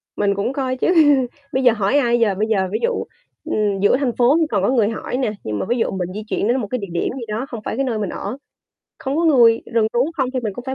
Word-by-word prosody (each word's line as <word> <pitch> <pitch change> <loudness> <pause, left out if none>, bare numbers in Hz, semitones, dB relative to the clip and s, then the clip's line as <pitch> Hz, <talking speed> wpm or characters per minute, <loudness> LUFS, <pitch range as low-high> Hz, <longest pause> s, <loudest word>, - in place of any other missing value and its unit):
Mình 200 -1 +1
cũng 200 +6 -2
coi 260 -2 -2
chứ, - - 0 0.7
bây 260 +1 +1
giờ 245 - +6
hỏi 210 +4 +1
ai 240 -4 +2
giờ? 215 -4 +2
Bây 215 +3 -1
giờ, 195 -4 +1
ví - - -1
dụ, 475 0 0 0.4
ừm, 205 -2 0
giữa 205 +5 +4
thành 270 -3 0
phố 250 +5 +4
thì 320 - +2
còn 200 -3 0
có - - +2
người 230 -5 +2
hỏi 230 - -4
nè, 255 -5 0
nhưng 105 -1 -3
mà - - -2
ví 240 - +1
dụ 230 - 0
mình 180 -2 -3
di 215 - -5
chuyển 210 - -1
đến 245 - +2
một 210 - -4
cái 255 - 0
địa 200 - -6
điểm - - -1
gì 240 - -6
đó 215 +4 -3
không 235 - -6
phải - - -3
cái 275 +3 0
nơi 230 -4 -2
mình 205 -3 -2
ở, 255 - -5 0.6
không 270 +2 -3
có 335 - +1
người, 235 -7 +5
rừng 225 -2 +3
rú 240 - +1 0.2
không 265 -3 0
thì 255 - 0
mình 215 -4 -3
cũng 245 - -8
phải 265 0 -3
235 Hz, 295 wpm, -20 LUFS, 210-260 Hz, 0.7 s, giờ